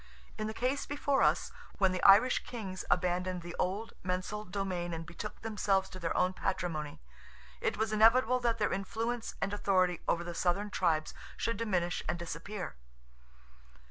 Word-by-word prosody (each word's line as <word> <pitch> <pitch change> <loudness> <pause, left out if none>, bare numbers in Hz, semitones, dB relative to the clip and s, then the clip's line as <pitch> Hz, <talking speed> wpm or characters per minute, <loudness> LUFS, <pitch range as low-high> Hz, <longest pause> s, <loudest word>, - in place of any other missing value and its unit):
In 215 0 -3
the 220 - -4
case 260 +3 -1
before 285 -1 +1
us, - - +3 0.3
when 190 -2 +4
the 185 - -2
Irish 205 +6 +6
Kings 195 -6 -6
abandoned 180 0 +1
the 175 0 -7
old 200 +5 -1
mensal 185 +3 -2
domain 180 -3 -3
and 165 0 -6
betook 175 +5 -7
themselves 200 -3 +1
to 185 - -9
their 165 -2 -1
own 185 +1 +3
patrimony, 165 -6 -3 0.6
it - - 0
was 220 0 0
inevitable 230 +3 +5
that 235 -2 +1
their 210 - +1
influence 225 +4 -3
and 200 - -1
authority 185 -4 +2
over 170 - +1
the 175 0 -5
southern 185 +4 0
tribes 160 -5 +1 0.2
should 230 - -1
diminish 180 -6 0
and - - 0
disappear. 170 - -6
190 Hz, 160 wpm, -32 LUFS, 175-220 Hz, 0.6 s, Irish